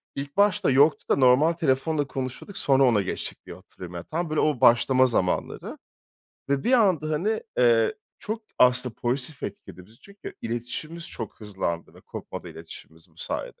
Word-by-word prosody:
ilk 140 0 -6
başta 200 -6 +3
yoktu 145 +4 +4
da - - +4
normal 140 +5 +5
telefonla 145 -1 0
konuşuyorduk, 130 +9 -6
sonra 135 -1 +3
ona 115 -6 +4
geçtik 95 - -5
diye - - -9
hatırlıyorum. 90 -1 -11
Ya, 85 - -5
tam 165 - -3
böyle 155 - 0
o 150 -5 +1
başlama 130 +2 +5
zamanları 95 -7 -1 0.7
ve 140 -1 +1
bir 250 - +2
anda 185 - +3
hani, 200 +9 0 0.2
eee, 115 -2 +4 0.2
çok 220 +2 -5 0.2
aslında 125 -1 +3
pozitif 130 +4 -3
etkiledi 90 -2 -8
bizi. 110 +3 -21
Çünkü 200 0 -11
iletişimimiz 125 +9 -5
çok 115 -1 -7
hızlandı 95 -5 -4
ve - - -15
kopmadı - - -8
iletişimimiz 80 +1 -13
bu 80 - -30
sayede. - - -5
130 Hz, 165 wpm, -25 LUFS, 115-155 Hz, 0.7 s, normal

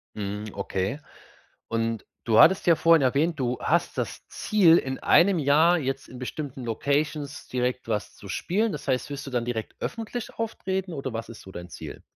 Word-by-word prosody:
Mhm, 105 0 -4
okay. 100 +5 -2 0.7
Und 115 -1 -1 0.2
du 110 -2 +3
hattest 190 +4 +6
ja 170 - +7
vorhin 165 0 +5
erwähnt: 150 +5 +2
Du 125 -2 -1
hast 170 +2 0
das - - -4
Ziel, 180 -6 +4
in 130 0 -3
einem 185 +1 +5
Jahr 155 +4 +4
jetzt 135 -1 -3
in 125 - -10
bestimmten 130 0 -5
Locations 145 +4 -1
direkt 125 -1 -2
was 105 -2 -2
zu 100 - -12
spielen. 210 - 0
Das - - -7
heißt, 130 +1 0
wirst 140 0 -5
du - - -6
dann 120 -2 0
direkt 115 -2 -4
öffentlich 230 +1 -5
auftreten, 190 -5 -3
oder 135 -4 -4
was 115 0 -5
ist 115 - -10
so 95 - -12
dein 90 0 -8
Ziel? - - -9
135 Hz, 185 wpm, -26 LUFS, 115-165 Hz, 0.7 s, ja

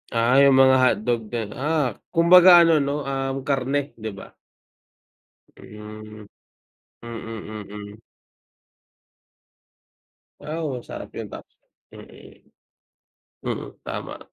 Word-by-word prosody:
Ah 120 +4 +3
'yung 140 -1 +6
mga 130 0 +6
hotdog 120 -2 +1
din, 110 -2 -5
ah, 145 -1 -1 0.2
kumbaga 175 +1 +8
ano 165 -2 +4
'no, 140 +1 -2
um, 135 0 -3
karne 140 +1 -1
'di 110 0 -5
ba. 100 - -12 1.3
Hmm. 105 0 -11 0.8
Mm, 110 -2 -8
mm. 105 +1 -10 2.4
Ah 160 +2 -5
oo, 135 -6 -4
sarap - - -8
'yun - - -5
tap - - -9 0.4
mm. - - -16 0.9
Mm, - - -5 0.2
tama. - - -6
130 Hz, 100 wpm, -23 LUFS, 110-145 Hz, 2.4 s, kumbaga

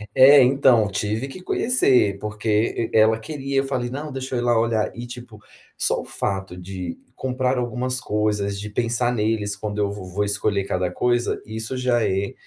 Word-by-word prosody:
É, 135 +2 +8
então, 125 -4 +4
tive 105 +7 -2
que 180 +7 -10
conhecer, 130 - +2
porque 110 +2 -1
e - - +4
ela 110 +1 +4
queria, 140 0 -4
eu - - +1
falei: 125 -3 -2
"Não, 145 +4 -5
deixa 130 0 -4
eu - - 0
ir - - -1
lá 120 -1 +3
olhar", 115 -2 0
e 120 +1 -6
tipo, 120 -3 -10 0.4
só - - +1
o - - -11
fato 95 -2 -3
de 90 -1 -6 0.2
comprar 130 0 -1
algumas 125 +1 -2
coisas, 105 -3 -1
de 105 +1 -6
pensar 120 +2 0
neles 105 -2 -1
quando 105 +1 -5
eu 100 -1 +1
vo 100 -2 -7
vou 95 +3 -2
escolher 100 -1 0
cada 90 -2 -1
coisa, 120 +4 0
isso 110 +3 -4
já 125 -2 +1
é 95 +1 -1
115 Hz, 190 wpm, -22 LUFS, 105-125 Hz, 0.4 s, É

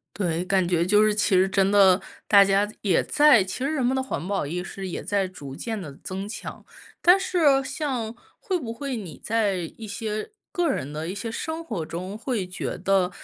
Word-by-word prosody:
对， 175 -3 -1
感 185 -1 +1
觉 170 -1 +2
就 210 +3 +5
是 215 -1 +2
其 205 -2 +2
实 185 +1 +5
真 195 0 +2
的 195 -2 +6 0.3
大 200 -1 +8
家 200 +1 +2
也 190 -5 +3
在， 295 -8 +5
其 190 +7 -5
实 275 - 0
人 280 -5 0
们 255 +2 +2
的 265 - 0
环 220 -9 -4
保 195 -5 -1
意 170 +5 -3
识 190 +1 -6
也 180 - -4
在 200 -1 0
逐 145 -7 -9
渐 220 +3 -4
地 150 -6 -8
增 190 +1 -5
强， 210 - -8 0.4
但 355 +2 +7
是 315 -8 +3
像 255 -7 -3 0.3
会 370 -2 -1
不 230 -6 -5
会 270 0 -4
你 175 -10 -8
在 200 -7 0
一 225 - -8
些 215 - -4 0.2
个 350 -3 +1
人 140 - -2
的 155 +2 -4
一 185 - -4
些 225 +3 -4
生 320 +7 -4
活 215 - -4
中， 185 +5 -6
会 230 -4 -2
觉 180 0 -5
得 190 0 +2
200 Hz, 225 characters per minute, -25 LUFS, 185-240 Hz, 0.4 s, 大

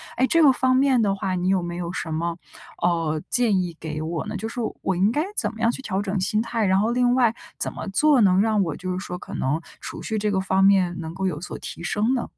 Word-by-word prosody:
哎， 255 - +3
这 330 - +4
个 275 - +8
方 255 0 +2
面 260 -2 +3
的 200 -2 +1
话， 195 -1 -2
你 180 0 -1
有 190 -1 +2
没 175 0 -5
有 175 -1 -4
什 160 - -4
么， 170 +1 -2 0.4
呃， 165 -3 0
建 225 -6 +3
议 175 -2 -5
给 155 -1 -5
我 165 +3 -3
呢？ 215 - -5
就 220 - -4
是 245 - -6 0.2
我 190 - 0
应 195 +4 +2
该 300 +6 0
怎 210 -2 +2
么 220 - -12
样 230 - +3
去 265 - -6
调 200 -5 -2
整 195 -1 -2
心 210 +3 +1
态， 230 -2 -1
然 190 0 +3
后 220 +3 +1
另 245 0 +2
外 240 -3 +3 0.2
怎 - - 0
么 - - -7
做 275 +5 +4
能 185 -2 +4
让 215 -1 +2
我 165 -4 -3
就 185 0 -5
是 180 - -2
说， 180 - -5
可 - - -10
能 145 +5 -1 0.2
储 - - -7
蓄 220 -1 -2
这 210 0 0
个 190 - +1
方 190 0 +1
面 190 -3 +4
能 160 0 -6
够 190 +1 -3
有 150 -5 -3
所 - - -6
提 - - -7
升 215 +8 +1
呢？ 245 - -1
195 Hz, 290 characters per minute, -23 LUFS, 175-230 Hz, 0.4 s, 个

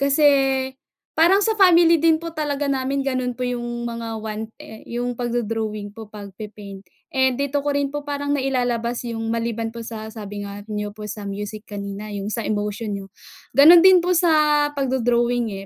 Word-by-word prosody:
kasi 280 +2 +3 0.9
parang 375 +5 +5
sa 450 - +2
family 340 -3 +6
din 325 0 +4
po 335 - -4
talaga 295 -2 -2
namin, 270 +1 -1
gano'n 255 -2 -1
po 250 - -3
'yong 240 -1 -3
mga 230 -1 -5
one 215 0 -4
eh, 220 - -11
'yong 245 +1 -2
pagdo-drawing 220 -3 -2
po, 220 -1 -10
pagpe-paint. 205 -1 -9 0.3
Eh, 260 -1 +3
dito 280 +1 -1
ko 290 - +1
rin 285 0 0
po 290 0 -4
parang 285 0 -2
nailalabas 245 -3 -1
'yong, 225 -1 -4
maliban 230 -1 -2
po 235 - -8
sa 220 -1 -7
sabi 205 -2 -7
nga 200 0 -7
niyo 210 -1 -3
po 215 - -8
sa 205 0 -6
music 205 +2 -6
kanina, 200 0 -6
'yong 200 0 -4
sa 230 - -2
emotion 210 0 -2
niyo. 195 -1 -6 0.5
Gano'n 330 +5 +9
din 375 -1 +8
po 360 +1 +1
sa 305 -3 +4
pagdo-drawing 245 -3 +1
240 Hz, 170 wpm, -22 LUFS, 215-280 Hz, 0.9 s, Gano'n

